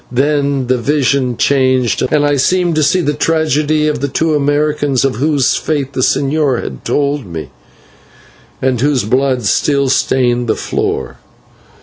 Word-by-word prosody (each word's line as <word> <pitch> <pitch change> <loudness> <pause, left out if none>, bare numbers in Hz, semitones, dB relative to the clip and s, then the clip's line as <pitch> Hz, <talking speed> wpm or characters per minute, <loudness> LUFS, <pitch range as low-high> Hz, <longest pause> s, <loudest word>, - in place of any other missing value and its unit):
Then 140 0 0
the 125 0 0
vision 135 -2 0
changed 130 -3 +1
and 145 -1 +2
I 145 0 +2
seemed 175 +5 +1
to 155 - +1
see 180 +5 +2
the 150 -3 -1
tragedy 155 0 0
of 150 -3 -2
the 140 - 0
two 160 +3 0
Americans, 145 -2 0
of 130 -6 -1
whose 145 0 +1
fate 140 -3 -2
the - - -2
señor 140 0 +1
had 65 -2 -8
told 140 -4 -1
me 80 -6 -7 1.1
and 130 -3 0
whose 140 -2 +1
blood 130 +3 0
still 140 +7 +1
stained 120 -2 +1
the 110 - +1
floor. - - -3
140 Hz, 150 wpm, -14 LUFS, 130-150 Hz, 1.1 s, and